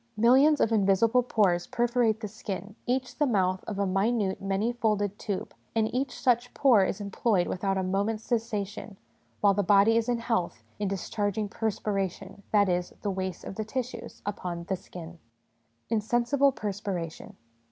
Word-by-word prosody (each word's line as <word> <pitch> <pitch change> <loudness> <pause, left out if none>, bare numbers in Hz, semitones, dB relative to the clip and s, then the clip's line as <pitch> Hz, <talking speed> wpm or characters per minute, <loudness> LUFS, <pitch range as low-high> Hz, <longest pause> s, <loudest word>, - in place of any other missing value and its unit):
Millions 265 +7 +5
of 225 - +2
invisible 220 +3 +4
pores 195 -8 +1
perforate 235 -2 +1
the 215 - -3
skin, 205 -1 -6
each 255 +3 -1
the 295 - +3
mouth 185 -5 +1
of 210 - -4
a 200 - +1
minute 195 +1 0
many 195 +4 0
folded 210 -3 0
tube, 200 -3 -4 0.2
and 220 -1 +1
each 255 0 -2
such 245 -1 +2
pore 245 -8 +5
is 190 +2 -2
employed 200 -1 +1
without 195 +1 -1
a 190 - 0
moment's 200 +4 -1
cessation, 210 -3 -3 0.4
while 200 -1 +5
the 205 - +1
body 205 +4 +5
is 230 +1 0
in 240 - +2
health, 185 - -2 0.2
in 205 - 0
discharging 205 +2 -2
perspiration 200 -3 -3
that 205 -2 +4
is, 180 -1 0
the 205 - 0
waste 190 -1 -4
of - - -6
the 215 - -3
tissues 250 +3 -5
upon 180 -4 -4
the 190 +2 -2
skin. 175 -2 -10 0.7
Insensible 240 +5 +2
Perspiration. 195 -7 -5
205 Hz, 160 wpm, -28 LUFS, 195-230 Hz, 0.7 s, Millions